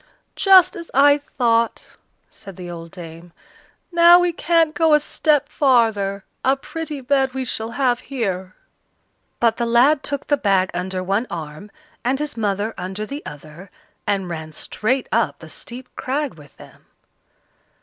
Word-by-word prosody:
"Just 380 -2 +6
as 335 -1 -8
I 285 +2 +6 0.2
thought!" 230 -2 +1 0.4
said 195 -3 -11
the 175 -1 -8
old 165 -1 -8
dame, 170 -1 -11 0.6
"now 340 0 +8
we 355 -1 +1
can't 330 -2 +2
go 320 -2 +4
a - - +4
step 300 -1 +1
farther; 220 -7 +2 0.2
a 265 +1 +3
pretty 305 0 -6
bed 265 0 +1
we 260 -1 -2
shall 225 -2 -4
have 250 -3 +2
here!" 190 -8 -4 0.8
But 230 -1 +2
the 235 - -1
lad 260 +5 +4
took 285 -1 -4
the 290 - +1
bag 195 -6 +1
under 185 +1 -3
one 200 +6 0
arm, 155 +4 -7 0.3
and 255 +3 +1
his 295 +1 -4
mother 210 0 -1
under 190 +3 -4
the 280 +6 -7
other, 155 +5 -11 0.4
and 195 -2 0
ran 160 -2 -6
straight 250 - -2
up - - +1
the - - -13
steep 250 +2 -9
crag 280 +1 -2
with 150 -3 -17
them. - - -16
235 Hz, 155 wpm, -21 LUFS, 190-285 Hz, 0.8 s, now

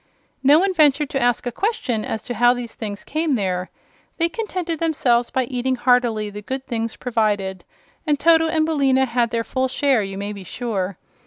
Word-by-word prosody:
No 280 +3 +6
one 380 +3 +2
ventured 295 -3 +3
to 270 - -1
ask 245 0 +1
a 245 - -2
question 255 - -1
as 220 - -4
to 245 - -4
how 245 +1 +4
these 240 -2 -6
things 205 -2 -6
came 310 -2 0
there. 185 -4 -2 0.5
They 335 0 +2
contented 360 -6 -3
themselves 245 -7 +1
by 260 - 0
eating 255 +1 -1
heartily 240 -4 +2
the 205 +1 -7
good 265 +5 -5
things 230 -2 -3
provided, 205 -6 -1 0.4
and 295 -2 +2
Toto 325 0 +5
and 315 -1 +1
Billina 270 -4 +2
had 235 -1 0
their 230 0 -1
full 260 +2 -1
share, 265 -2 +2
you 195 -1 -5
may 200 +1 -4
be 200 -2 -9
sure. 195 -2 -3
245 Hz, 190 wpm, -21 LUFS, 220-290 Hz, 0.5 s, No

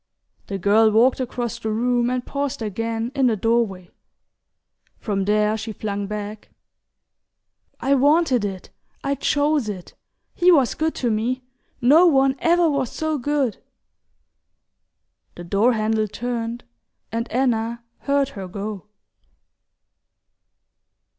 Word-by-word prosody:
The 195 - -3
girl 210 +4 +4
walked 235 +5 +3
across 245 -2 -3
the 220 - -3
room 240 +2 +1
and 250 -1 -2
paused 280 -3 -3
again 225 +3 -3
in 270 -2 +2
the 230 - +2
doorway. 210 -4 0 1.1
From 195 -3 -2
there 210 +1 +2
she 220 0 -5
flung 205 -1 -4
back: 210 0 -6 1.3
"I 275 - +1
wanted 280 -3 +3
it 190 -3 -5 0.3
I 275 - 0
chose 290 -3 +1
it. 185 -4 -7 0.4
He 360 0 +4
was 275 -8 +4
good 315 0 -1
to 240 -3 0
me 240 +4 -1 0.4
no 305 +9 +6
one 270 -3 +3
ever 340 0 +3
was 280 -5 0
so 315 -2 -2
good!" 275 -3 0 1.8
The 175 - -8
door 200 +8 +2
handle 215 0 0
turned, 235 +2 -4 0.5
and 230 +1 -3
Anna 235 -2 0 0.2
heard 280 -1 +1
her 195 -8 -7
go. 200 +1 -6
235 Hz, 120 wpm, -22 LUFS, 215-270 Hz, 1.8 s, no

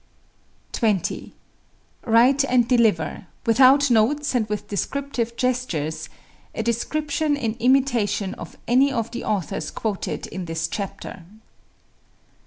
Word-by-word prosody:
20. 210 -7 -1 0.8
Write 250 +5 +5
and 245 -3 +3
deliver, 220 -9 +1 0.2
without 265 +4 +5
notes 275 +7 +2
and 225 -4 0
with 210 -1 -3
descriptive 235 +1 -3
gestures, 240 - -2 0.5
a 225 - -2
description 290 +6 -1
in 230 -6 -1
imitation 235 -6 +2
of - - -10
any 265 +4 +4
of 230 -3 -2
the 235 - -5
authors 170 -6 -2
quoted 210 -4 -3
in 185 -1 -6
this 165 0 -2
chapter. 195 -1 -6
235 Hz, 110 wpm, -23 LUFS, 205-265 Hz, 0.8 s, Write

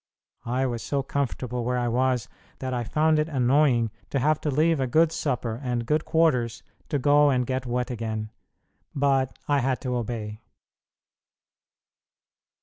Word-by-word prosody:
I 130 +3 0
was 120 -3 -2
so 140 -1 -1
comfortable 125 -3 -2
where 125 +1 0
I 120 -1 0
was 125 -1 +1 0.3
that 130 -1 -4
I 120 -1 -1
found 155 +7 +2
it 155 +1 0
annoying 130 -4 +3 0.2
to - - -1
have 150 +3 +2
to 150 - -1
leave 155 +2 +2
a 130 - 0
good 160 +5 +3
supper 125 -6 -2
and 120 -2 -2
good 150 +5 0
quarters 125 -8 +1 0.3
to 145 - +1
go 145 +2 +4
and 125 -2 +1
get 130 0 -3
wet 125 +1 -1
again, 110 -2 -4 0.6
but 135 -2 +1
I 145 -1 +3
had 130 0 0
to 125 -2 -2
obey. 110 -2 -4
130 Hz, 155 wpm, -26 LUFS, 120-145 Hz, 0.6 s, go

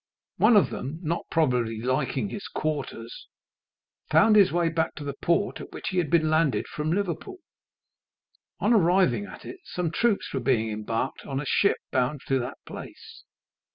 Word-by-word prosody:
One 230 - +6
of 205 - +3
them, 140 +5 -5
not 170 +2 -2
probably 125 -8 +1
liking 130 - -1
his 205 - -6
quarters, 140 -6 -4 0.8
found 220 -1 +5
his 200 -3 +6
way 175 0 +1
back 160 0 -1
to 150 - -7
the 140 -1 -4
port 170 +7 0
at - - -10
which - - -5
he 185 - 0
had 165 -4 -1
been 160 -1 +3
landed 155 -3 +2
from 150 +1 -3
Liverpool. 200 - -2 1.2
On 220 - +3
arriving 175 - +3
at 95 - -11
it, 375 - -8
some 175 -3 -3
troops 225 +3 0
were 135 - 0
being 115 -3 +1
embarked 115 +4 -3
in 135 -1 -3
a 150 - -4
ship 200 - +2
bound 130 +2 0
to 135 -1 +3
that 125 - -5
place. - - -11
155 Hz, 170 wpm, -26 LUFS, 130-180 Hz, 1.2 s, One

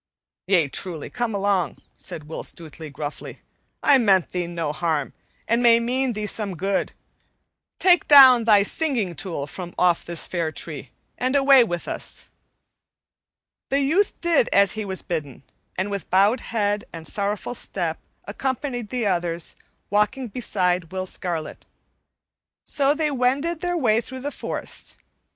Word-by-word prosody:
"Yea, 180 -6 +3
truly, 160 +2 -5
come 240 -3 -2
along," 195 -5 0 0.2
said 155 - -7
Will 160 - -5
Stutely 160 -1 -10
gruffly. 145 +1 -7 0.4
"I 275 -2 +6
meant 195 -6 +3
thee 180 -1 -2
no 170 -3 -3
harm, 155 -3 -1 0.3
and 230 +2 +2
may 235 -1 +6
mean 250 +2 0
thee 210 0 -3
some 205 -2 -3
good. 195 +4 -1 0.8
Take 355 -3 +4
down 260 -5 +9
thy 210 -3 +6
singing 235 - 0
tool 165 -4 -4
from 175 +4 -8
off 175 -2 +3
this 170 -1 0
fair 170 -3 -2
tree, - - -6 0.3
and 255 +2 0
away 275 -2 +7
with 175 -6 -4
us." - - -4 1.4
The 275 +1 +2
youth 340 +9 +1
did 335 -8 +3
as 200 -1 +5
he 215 -1 -4
was 190 -1 -4
bidden 145 -6 -5 0.3
and, 190 +2 -1
with 200 -1 -5
bowed 200 +6 +4
head 205 -2 -1
and 165 -1 -9
sorrowful 205 +6 -1
step, 175 -8 -3 0.3
accompanied 245 +1 -3
the 250 -3 -2
others, 175 -3 -1 0.4
walking 210 +5 +1
beside 180 -7 -1
Will 185 0 -3
Scarlet. 175 -4 -5 1.0
So 280 +1 +2
they 305 -1 0
wended 280 +6 0
their 355 -1 -1
way 225 -7 +2
through 260 +2 -8
the 290 +2 -3
forest. - - -4
205 Hz, 145 wpm, -23 LUFS, 175-255 Hz, 1.4 s, down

